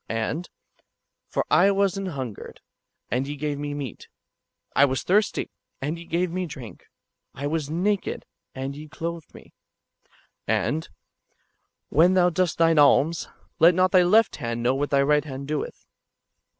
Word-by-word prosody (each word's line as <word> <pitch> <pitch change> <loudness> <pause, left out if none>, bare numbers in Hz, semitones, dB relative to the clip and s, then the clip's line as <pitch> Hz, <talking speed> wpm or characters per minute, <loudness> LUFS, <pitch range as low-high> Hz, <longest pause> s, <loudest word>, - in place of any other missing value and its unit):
"^ - - -52
And, 115 +10 -2 0.4
" - - -57
For - - -1
I 190 +3 +6
was 200 -1 +2
an 195 -1 -3
hungered, 130 - -6 0.5
and 130 +4 0
ye 145 - -4
gave 145 0 -3
me 145 0 -4
meat; 140 -5 -7 0.7
I 140 - +6
was 135 -2 +1
thirsty, 205 +3 +1 0.3
and 155 +5 -3
ye 170 - -10
gave 170 +1 -1
me 180 0 -2
drink; 125 -7 -10 0.5
I 140 - -5
was 150 -1 -2
naked, 190 +5 -1 0.3
and 135 +1 -4
ye 150 +1 -9
clothed* 165 +1 -6
me." - - -15 0.5
'^ - - -37 0.3
And, 160 +2 0 0.5
" - - -50
When 175 +5 +4
thou 180 -1 +4
doest 180 0 0
thine 165 -2 +4
alms, 150 +3 +4 0.3
let 170 +1 +6
not 185 0 +3
thy 185 - +6
left 210 +5 +4
hand 115 0 -3
know 125 +2 +3
what 145 +2 -1
thy 140 -1 +3
right 150 +1 +3
hand 140 -2 -7
doeth." 150 -1 -4
155 Hz, 170 wpm, -25 LUFS, 140-180 Hz, 0.7 s, I